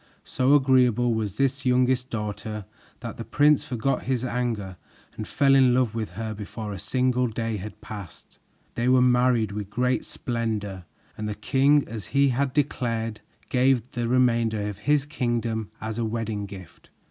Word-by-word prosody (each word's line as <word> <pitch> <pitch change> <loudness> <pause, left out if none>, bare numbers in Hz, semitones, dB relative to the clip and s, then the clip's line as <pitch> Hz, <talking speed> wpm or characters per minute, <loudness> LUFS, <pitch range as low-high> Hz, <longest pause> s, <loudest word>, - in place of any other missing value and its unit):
So 130 +2 +3
agreeable 125 -3 +4
was 110 -3 -3
this 135 0 0
youngest 125 0 +2
daughter 105 -1 -4 0.4
that - - -6
the - - -5
prince 150 0 +3
forgot 125 +2 -1
his 130 -1 0
anger 115 -7 -2 0.4
and 110 - -6
fell 140 -1 +3
in 130 -2 +5
love 125 -4 +2
with 110 -5 -4
her 110 +2 -4
before 105 0 -6
a 95 - -6
single 125 +4 +1
day 115 -1 -3
had 105 +2 -8
passed. 100 -5 -10 0.3
They 120 +1 -1
were 130 0 +5
married 125 -3 +3
with 100 -1 -5
great 125 +4 0
splendor 105 -6 -3 0.3
and 105 0 -4
the 105 - -3
king, 140 +4 +3
as 110 -2 -7
he 140 0 +5
had 135 +2 0
declared, 115 -6 -1 0.3
gave 130 -1 +3
them 120 - -27
the 120 - 0
remainder 115 -4 +2
of 105 -1 -6
his 145 -1 +4
kingdom 120 -6 -2
as 110 +1 -4
a - - 0
wedding 110 -2 -3
gift. 95 -3 -12
120 Hz, 170 wpm, -25 LUFS, 110-130 Hz, 0.4 s, in